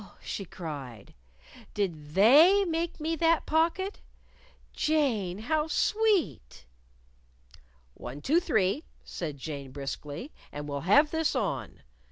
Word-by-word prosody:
she 195 - -5
cried; 140 - -8 0.6
"did 155 -7 -3
They 310 - +7
make 335 -1 -2
me 320 +2 -1
that 330 +1 +2
pocket? 340 +5 0 0.7
Jane, 240 - 0
how 305 +8 -1
sweet!" 330 - 0 1.3
"One, 130 - -8
two, 305 - +2
three," 220 - +1 0.2
said 155 -5 -5
Jane, 140 -1 -6
briskly, 145 - -6 0.2
"and 145 0 -6
we'll 140 -1 -3
have 290 +8 +6
this 320 -2 0
on! 215 -7 -3
220 Hz, 110 wpm, -28 LUFS, -, 1.3 s, They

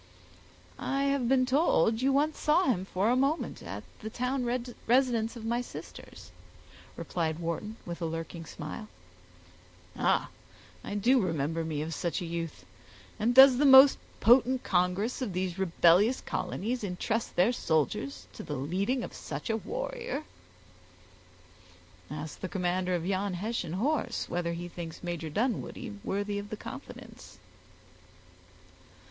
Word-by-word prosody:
"I 275 0 -1
have 275 -3 +1
been 260 -1 +4
told 250 - +3
you 270 +1 +3
once 295 +3 +1
saw 305 +5 +3
him 190 -8 +1
for 195 +4 +1
a - - +3
moment, 275 +5 0
at - - -7 0.2
the 220 - -6
town 250 +3 -1 0.4
residence 240 -2 +2
of 230 -2 -8
my 235 +2 0
sisters," - - -10 0.7
replied 160 -3 -2
Wharton, 170 +6 -4
with 170 0 -6
a 165 - 0
lurking 165 +1 -5
smile. 155 +8 -7 1.1
"Ah! - - +1 0.5
I 205 - -5
do 245 +5 +4
remember 165 -2 -1
me 155 -2 -2
of 165 +1 -4
such 170 +4 -2
a 180 - -4
youth; 165 - -5 0.5
and 235 +3 +1
does 265 -1 +9
the 295 - +4
most 265 +1 +9 0.2
potent 250 +3 +5
congress 185 +8 0
of 225 -7 -2
these 185 0 -2
rebellious 185 +5 +4
colonies 235 +4 -3
intrust 205 +4 -2
their 185 +7 +4
soldiers 140 - -1
to - - -8
the 150 - -5
leading 195 - -1
of - - -7
such 150 +9 -5
a 220 - +1
warrior!" 485 - -4 1.9
"Ask 150 +1 -6
the 185 - -4
commander 180 -1 0
of 170 -1 -3
yon 190 0 -1
Hessian 205 -3 -3
horse, 250 +4 -1
whether 170 -1 -2
he 175 +1 -5
thinks 170 -1 -8
Major 170 -2 -4
Dunwoodie 215 - -2
worthy 205 +1 -2
of 205 0 -8
the 215 - -5
confidence." 250 +5 -10
205 Hz, 140 wpm, -29 LUFS, 170-250 Hz, 1.9 s, does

